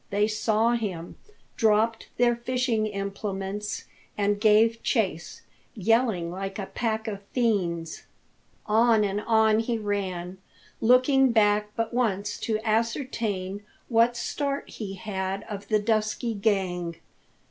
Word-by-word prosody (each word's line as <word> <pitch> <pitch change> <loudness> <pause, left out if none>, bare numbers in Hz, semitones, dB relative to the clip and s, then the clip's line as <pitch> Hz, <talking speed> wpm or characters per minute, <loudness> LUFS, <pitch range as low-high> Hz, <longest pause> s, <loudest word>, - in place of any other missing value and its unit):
They 205 +1 +2
saw 220 +1 +1
him, 195 -8 -3 0.4
dropped 220 +1 +2
their 240 0 +4
fishing 240 -2 0
implements, 200 0 -4 0.3
and 205 0 +1
gave 225 +1 +4
chase, 185 - -1 0.3
yelling 220 -5 +1
like 195 +2 -5
a 200 - -3
pack 220 +1 -2
of 200 -2 -4
fiends. 175 -9 0 0.6
On 220 0 +4
and 200 0 -1
on 220 -1 +3
he 230 +1 -1
ran, 190 -4 -3 0.4
looking 255 +3 +5
back 210 -2 +3
but 230 0 -2
once 205 -4 0
to 220 -2 -1
ascertain 220 -4 -1 0.3
what 235 0 +3
start 280 +3 -3
he 195 -3 -6
had 190 -1 -3
of 205 -2 -7
the 215 - +3
dusky 215 +2 0
gang. 190 -5 -1
215 Hz, 120 wpm, -26 LUFS, 195-230 Hz, 0.6 s, looking